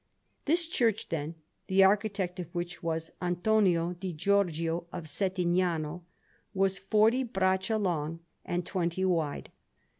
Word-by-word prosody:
This 335 +3 +2
church, 230 -9 0
then, 160 0 -3 0.3
the 190 0 +5
architect 195 -2 +1
of 175 - -4
which 175 +1 -4
was 165 -1 -2
Antonio 180 -1 +2
di 180 0 -5
Giorgio 170 -1 +1
of 175 - -5
Settignano, 175 -1 0 0.5
was 195 0 +1
forty 220 +4 +3
braccia 190 -2 +1
long 165 -5 -1 0.2
and 175 0 -2
twenty 180 0 -1
wide. 165 -6 -1
180 Hz, 120 wpm, -30 LUFS, 170-195 Hz, 0.5 s, the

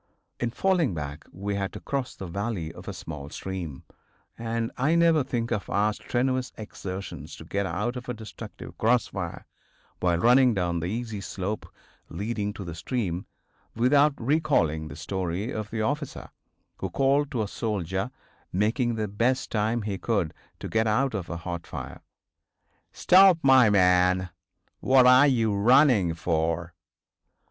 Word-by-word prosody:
In 120 - 0
falling 170 - +1
back 75 0 -6
we 100 +2 -4
had 100 -1 -2
to - - -7
cross 135 -2 -3
the 95 - -7
valley 90 -2 -3
of - - -12
a - - -2
small 75 -3 -7
stream, 85 -6 -6 0.5
and 115 0 -2
I 150 +6 +2
never 165 -3 +4
think 120 -3 -3
of 105 -4 -2
our 105 +2 +2
strenuous 130 +3 -1
exertions 100 -3 -7
to - - -11
get 100 -1 -1
out 120 +5 -2
of 125 0 -7
a - - -1
destructive 110 -2 -10
cross 120 +2 +3
fire, 85 -4 -5 0.5
while 90 -1 +2
running 125 +4 +5
down 85 -2 0
the 85 - -3
easy 110 0 -4
slope 100 +2 -4 0.4
leading 105 +3 -3
to 100 - -7
the 85 -3 -6
stream, 90 -1 -3 0.5
without 140 +5 +4
recalling 115 - +1
the - - -9
story 95 +4 -3
of 110 -1 -4
the 110 -1 -2
officer 145 +3 -3 0.5
who - - -4
called 140 +1 +2
to 120 -7 -1
a - - -3
soldier 100 -1 -2 0.4
making 115 +5 +1
the 110 -1 -2
best 120 +6 0
time 110 +1 0
he 100 -2 -3
could 100 -9 0 0.3
to - - -4
get 110 0 +1
out 130 +5 +1
of 95 -5 -4
a 85 - -4
hot 85 0 -6
fire: - - -7 0.9
"Stop, 190 -1 +6
my 130 -4 +7
man! 90 -2 +3 0.5
What 130 -1 +5
are 130 +3 +7
you 115 -6 +2
running 110 - +4
for?" 85 0 -1
110 Hz, 155 wpm, -26 LUFS, 90-125 Hz, 0.9 s, my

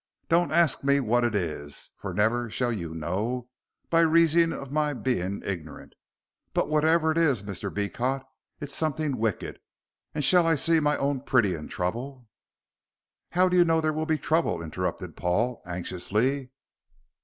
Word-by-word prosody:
Don't 170 +1 +3
ask 165 -4 +3
me 140 0 +3
what 120 -1 +1
it 120 -3 0
is, 75 -6 -4
fur - - -6
never 115 +3 +1
shall 120 +2 -1
you 85 -6 -5
know, 105 +10 -3 0.4
by 165 - +4
reason 165 0 +4
of 135 -4 -7
my 150 -1 0
being 100 -7 -2
ignorant. 85 -5 -6 0.6
But - - +1
whatever 160 +1 +3
it 160 - +1
is, 140 -11 +2
Mr. 100 -3 -5
Beecot, 125 +7 -2 0.4
it's 145 -2 -4
something 150 -4 -1
wicked, 110 -3 -2 0.6
and 150 - -1
shall 175 +4 +5
I 165 - +4
see 165 +3 +3
my 150 -1 +1
own 140 -1 -1
pretty 120 -9 +2
in 75 -3 -6
trouble?" 120 +7 -4 1.1
"How 185 +1 +4
do 180 - +1
you 175 - +7
know 165 -1 +2
there 155 -1 0
will 155 +1 -2
be 160 -1 +2
trouble?" 155 - 0
interrupted 90 +1 -4
Paul, 95 +8 0
anxiously. 105 +10 -1
130 Hz, 160 wpm, -27 LUFS, 100-155 Hz, 1.1 s, you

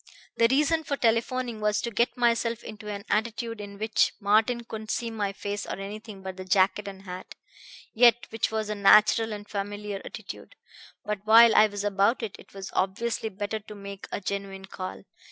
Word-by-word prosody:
"The 230 - +5
reason 300 +4 +2
for 280 -2 -2
telephoning 235 0 0
was 210 0 +1
to 235 - -2
get 235 +4 +1
myself 235 -1 +1
into 215 -1 -8
an 200 -1 -6
attitude 230 0 -1
in 200 -1 -9
which 215 +1 +2
Martin 220 +3 +2
couldn't 220 -1 -8
see 235 0 -2
my 205 -3 -2
face 205 +1 -5
or - - -3
anything 200 0 -8
but 190 -1 -6
the 185 - -6
jacket 190 +2 +2
and 195 -1 -8
hat, 185 -1 -8 0.6
yet 240 0 +5
which 225 - 0
was 220 -1 -1
a - - 0
natural 215 +2 +5
and 205 0 -7
familiar 205 0 -4
attitude. - - -9 0.5
But 210 -1 -2
while 225 +1 +8
I 215 - +7
was 205 -1 -5
about 205 +4 +2
it, 215 - -4
it - - -16
was 195 -1 -8
obviously 220 +4 -1
better 205 +2 -4
to 210 0 -12
make 200 -1 -9
a - - -2
genuine 195 -1 -5
call. 185 -1 -7
210 Hz, 190 wpm, -27 LUFS, 200-230 Hz, 0.6 s, while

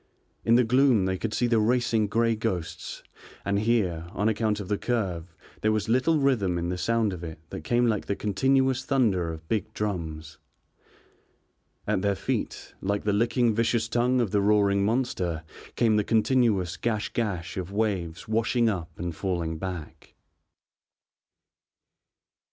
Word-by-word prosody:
In 115 - +4
the 125 - +5
gloom 125 -3 +4
they 95 0 0
could 115 - -2
see 120 - 0
the 115 -2 +3
racing 115 -1 +2
grey 115 +2 +2
ghosts, 95 -7 -4 0.4
and 100 0 +1
here, 100 -7 0
on 105 - 0
account 110 -1 0
of 100 - -6
the 105 +1 -1
curve, 90 -8 -2 0.3
there 110 - +2
was 110 -1 0
little 130 +7 +3
rhythm 120 -11 +1
in 85 0 -2
the 90 - -2
sound 115 -1 +1
of 90 -1 -7
it 80 -2 -6
that - - -5
came 120 0 +2
like 110 -3 0
the 100 - 0
continuous 130 +6 +1
thunder 105 -12 +1
of 80 0 -9
big 110 +1 -1
drums. 80 -6 -4 1.5
At - - 0
their 100 0 +1
feet, - - -3
like 100 +1 -1
the 105 - +1
licking 115 +2 +2
vicious 115 +1 +1
tongue 120 +2 +2
of 110 -5 -1
the 100 - +2
roaring 100 -1 +3
monster, 100 -8 -1 0.3
came 110 -3 +3
the 105 - +2
continuous 110 -6 +2
gash 110 -3 -1
gash 95 -7 -3
of 95 0 -4
waves 95 -6 -2
washing 115 +2 +2
up 90 -6 -4
and 85 -1 -4
falling 85 -4 -2
back. 85 -4 -7
105 Hz, 155 wpm, -27 LUFS, 90-115 Hz, 1.5 s, the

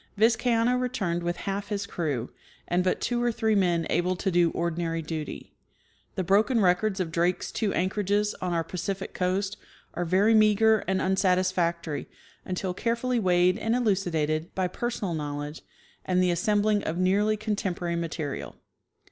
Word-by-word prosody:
Vizcaino 230 +2 +3
returned 200 -9 -1
with 175 0 -1
half 200 +2 -3
his 205 -1 -2
crew, 145 - -3 0.4
and 180 +1 +1
but 185 - +1
two 240 0 -1
or 240 0 +2
three 220 -1 0
men 175 -5 +2
able 180 +1 +1
to 190 +2 -1
do 175 -1 +4
ordinary 165 -1 -2
duty. 155 -2 -6 0.6
The 185 - -1
broken 210 +7 +3
records 190 +1 +2
of 175 -3 -2
Drake's 175 +2 0
two 215 -3 -1
anchorages 205 +3 0
on 180 - -1
our 165 -1 0
Pacific 190 +3 -4
coast 190 +3 -1 0.4
are 175 - -2
very 190 +6 +3
meager 215 0 +5
and 190 0 +1
unsatisfactory 180 -4 0 0.4
until 185 0 -2
carefully 235 +4 0
weighed 180 0 +3
and 225 +1 0
elucidated 170 -9 0
b}^ 185 -1 -1
personal 230 -7 -2
knowledge 145 0 -4 0.4
and 185 -1 +1
the 180 - +3
assembling 205 +4 +2
of 160 - -2
nearly 200 +4 +2
contemporary 190 -5 -2
material. 160 -3 -4
185 Hz, 150 wpm, -27 LUFS, 170-210 Hz, 0.6 s, meager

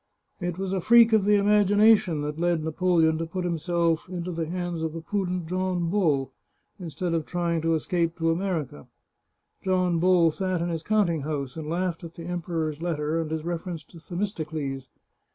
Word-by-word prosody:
It 175 -2 -3
was 190 0 -3
a 190 - 0
freak 230 +3 +6
of 215 -3 +4
the 210 0 +5
imagination 205 -4 +4
that 150 +1 -4
led 170 -2 +1
Napoleon 160 0 +2
to 165 - -3
put 180 +2 -4
himself 170 0 0
into 180 -1 -4
the 165 -2 -3
hands 175 -1 -3
of 160 -1 -2
the 165 - -6
prudent 180 -1 -2
John 180 -1 -1
Bull, 150 -10 +1 0.5
in 175 -3 -6
stead 170 +4 -3
of 165 -2 -1
trying 170 -2 -1
to 165 0 +2
escape 165 +1 -1
to 165 -1 +1
America. 165 - -3 0.8
John 185 -2 +1
Bull 175 -2 +4
sat 185 +1 -2
in 170 +1 -1
his 165 -2 -3
counting 180 -5 +1
house, 140 -3 -4
and 155 -2 -6
laughed 175 0 -2
at 170 0 -9
the 165 - -8
Emperor's 165 -3 -3
letter 160 -1 -1
and 160 - -4
his 160 0 -3
reference 170 -1 -4
to 165 +4 -15
Themistocles. 155 - -4
170 Hz, 185 wpm, -26 LUFS, 160-185 Hz, 0.8 s, freak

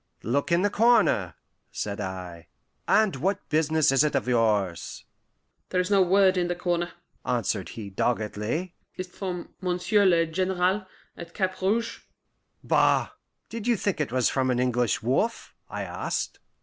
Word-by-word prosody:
"Look 140 +8 0
in 170 +2 +3
the 205 - +2
corner," 220 - +3 0.4
said 100 -1 -4
I. 90 -3 -6 0.4
"And 215 -8 +3
what 195 +8 -1
business 155 -1 +3
is't 145 +2 +3
of - - 0
yours?" 105 -7 0 0.6
"There 185 - 0
is 180 +2 -1
no 200 -1 +5
word 190 +1 +4
in 175 -1 +1
the 175 - -1
corner," 175 0 -1 0.3
answered 110 -5 -1
he 105 -4 -8
doggedly. 115 - -2 0.2
"Is't 185 0 -6
from 180 -3 -5
Monsieur 185 +3 +2
le 170 -2 +4
General 185 +3 0 0.3
at 170 0 -10
Cap 190 -2 -2
Rouge?" 220 +5 0 0.6
"Bah! - - +3 0.4
Did 230 0 -6
you 240 -2 +3
think 195 -5 -1
it 145 - -2
was 130 -1 +2
from 130 -1 0
an 125 - +1
English 125 -4 +1
wolf?" 140 - -1 0.2
I - - -4
asked. - - -3
170 Hz, 150 wpm, -26 LUFS, 120-190 Hz, 0.6 s, no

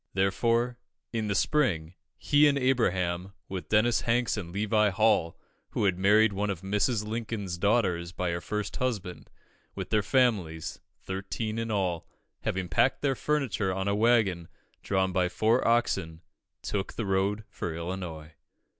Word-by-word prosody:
Therefore, 115 +6 +1 0.3
in 110 -2 -1
the 100 - 0
spring, 90 - +1 0.2
he 145 +1 +4
and 140 -1 +2
Abraham, 95 -8 0
with 95 -2 -6
Dennis 110 +3 +3
Hanks 120 +1 +1
and 90 -5 -5
Levi 105 +2 +2
Hall, 100 -4 +2 0.4
who - - 0
had 95 -3 +1
married 105 +2 +5
one 100 +1 -1
of 95 -4 -3
Mrs. 105 +3 0
Lincoln's 105 -5 -4
daughters 90 -5 +1
by 90 -1 -2
her 85 0 -3
first 105 +4 -4
husband, 105 -8 -3 0.5
with - - -6
their 105 - +3
families, 105 - 0 0.2
thirteen 105 +4 -4
in 115 0 -3
all, 90 -5 -1 0.3
having 95 -1 -2
packed 85 - +2
their 140 -2 +2
furniture 130 -9 -1
on 95 +1 -2
a 100 - +2
waggon, 105 -6 +2 0.3
drawn 95 -1 0
by 90 0 +1
four 110 +6 +2
oxen, 95 -9 +1 0.4
took 100 -2 -3
the 115 - -3
road 100 +2 0
for 85 -2 -4
Illinois. 85 -3 -6
100 Hz, 150 wpm, -28 LUFS, 90-115 Hz, 0.5 s, married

